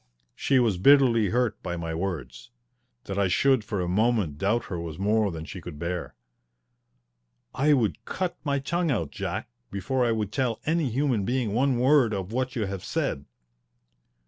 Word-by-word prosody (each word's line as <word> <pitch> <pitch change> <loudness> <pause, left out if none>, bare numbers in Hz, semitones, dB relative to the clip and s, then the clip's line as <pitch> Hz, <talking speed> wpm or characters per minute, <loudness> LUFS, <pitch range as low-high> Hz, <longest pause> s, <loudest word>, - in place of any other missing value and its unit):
She 135 - +2
was 110 -8 +2
bitterly 120 -3 +5
hurt 120 0 0
by 85 0 -4
my 85 -1 -4
words. 85 - -4 0.5
That 100 0 -4
I 100 - +3
should 130 +6 +3
for 105 -2 -3
a 90 - -2
moment 100 -5 +1
doubt 110 +3 +1
her 90 - -4
was 85 -2 -6
more 105 +2 +2
than 80 -3 -6
she 95 +2 -8
could 85 -3 -8
bear. 85 +2 -4 1.4
"I 150 +3 +3
would 115 -7 0
cut 185 -2 -3
my 140 -2 0
tongue 170 +5 -1
out, 85 - -1
Jack, - - -4 0.2
before 100 +7 -1
I 120 - +2
would 105 -3 -1
tell 120 -4 -1
any 160 -3 +1
human 125 -3 0
being 120 -1 -1
one 130 +2 +2
word 125 -3 +4
of 95 +1 -4
what 130 +1 -2
you 110 -4 0
have 95 -1 -5
said." 135 - -2
110 Hz, 175 wpm, -26 LUFS, 95-130 Hz, 1.4 s, bitterly